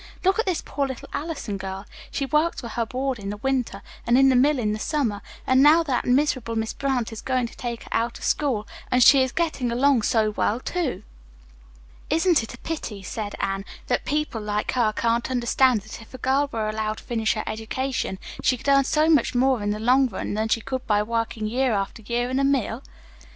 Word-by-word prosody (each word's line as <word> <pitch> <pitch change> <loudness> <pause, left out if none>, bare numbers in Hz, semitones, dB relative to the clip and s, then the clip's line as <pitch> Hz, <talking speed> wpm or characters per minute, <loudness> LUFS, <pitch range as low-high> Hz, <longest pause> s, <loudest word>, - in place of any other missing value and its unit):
Look 385 +4 +3
at 450 - 0
this 360 -3 0
poor, 280 -1 -1
little 265 -2 -7
Allison 285 -9 -4
girl. 190 +1 -6 0.2
She 275 - -2
works 305 +4 +1
for 235 - -6
her 230 0 -2
board 260 -1 -2
in 195 -1 -5
the 205 - -4
winter, 250 -4 -2 0.2
and 240 +1 +5
in 270 0 +6
the 260 - +3
mill 280 +4 +4
in 215 -4 0
the 215 - -4
summer, 235 -8 -1 0.2
and 260 0 +4
now 310 +4 +7
that 265 -6 -1
miserable 255 -3 +1
Miss 220 0 -1
Brant 255 -5 -1
is 220 - -7
going 255 -2 0
to - - -15
take 235 -2 -5
her - - -14
out 230 +1 0
of - - -12
school, 245 -9 0 0.2
and 250 0 +4
she 275 +1 +8
is 260 -1 +1
getting 290 -7 -1
along 260 +1 +3
so 215 0 +2
well, 210 +2 0
too." 265 - -3 1.1
"Isn't 330 0 +3
it 225 - -8
a - - -16
pity," 230 -11 -5
said 205 +1 -5
Anne, 195 0 -1 0.2
"that - - 0
people 300 -6 -2
like 210 0 -1
her 235 -4 +2
can't 235 +3 0
understand 250 -1 +3
that 215 +3 -10
if 225 - -13
a - - -6
girl 270 +3 +1
were 220 -2 -2
allowed 215 0 -2
to - - -11
finish 225 -2 0
her 215 - -2
education, 225 0 -3 0.2
she 255 - +2
could 280 - -3
earn 275 -1 +5
so 305 +3 +2
much 295 -6 +3
more 255 -1 +3
in 205 - -1
the 210 - -1
long 255 +4 +4
run 200 -3 -4
than 215 +1 0
she 225 +1 +1
could 260 +3 -4
by 210 -1 +3
working 230 0 -2
year 250 +3 +1
after 200 +2 -2
year 240 +3 -1
in 260 - +1
a - - +2
mill?" 265 -3 +1
245 Hz, 225 wpm, -24 LUFS, 220-270 Hz, 1.1 s, she